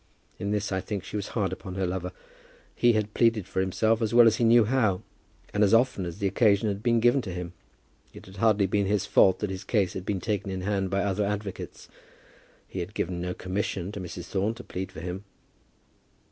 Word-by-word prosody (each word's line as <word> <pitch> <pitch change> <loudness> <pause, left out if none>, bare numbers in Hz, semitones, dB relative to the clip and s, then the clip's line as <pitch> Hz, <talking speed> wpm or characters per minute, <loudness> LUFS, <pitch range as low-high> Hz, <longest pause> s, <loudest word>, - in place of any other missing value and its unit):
In 100 - -3
this, 105 -1 -1
I 95 0 0
think, 100 -2 -4
she - - -8
was 100 -1 -2
hard 100 -3 0
upon 95 -2 -7
her 95 -1 0
lover. 90 0 -3 0.6
He 120 0 +3
had 105 -1 -1
pleaded 115 -4 +2
for - - -3
himself 110 +4 +1
as 110 0 0
well 120 -1 +9
as 115 -1 +4
he - - 0
knew 115 0 +6
how, 110 -5 +1 0.5
and 105 - +3
as 105 +2 +5
often 115 -6 +2
as 85 - -7
the 100 - -3
occasion 100 +1 +3
had 100 0 -3
been 115 0 +2
given 120 +4 +4
to 95 - -6
him. 90 -1 -6 0.6
It 105 - -13
had 95 0 -13
hardly 105 -1 +3
been 100 +1 +1
his 105 -1 +1
fault 95 - +4
that 105 -2 -1
his 95 -1 -5
case 100 -5 +1
had 95 - -5
been 100 -2 0
taken 100 -1 -2
in 95 -1 -3
hand 95 0 -1
by 100 +1 0
other 100 +1 0
advocates. 100 -1 -5 0.8
He - - -6
had - - -5
given 90 -1 -2
no 90 0 -3
commission 95 0 -3
to 105 - -6
Mrs. 90 - -7
Thorne 100 +4 -1
to 125 - -10
plead 95 0 -5
for 80 - -9
him. 90 +3 -5
100 Hz, 225 wpm, -27 LUFS, 95-110 Hz, 0.8 s, well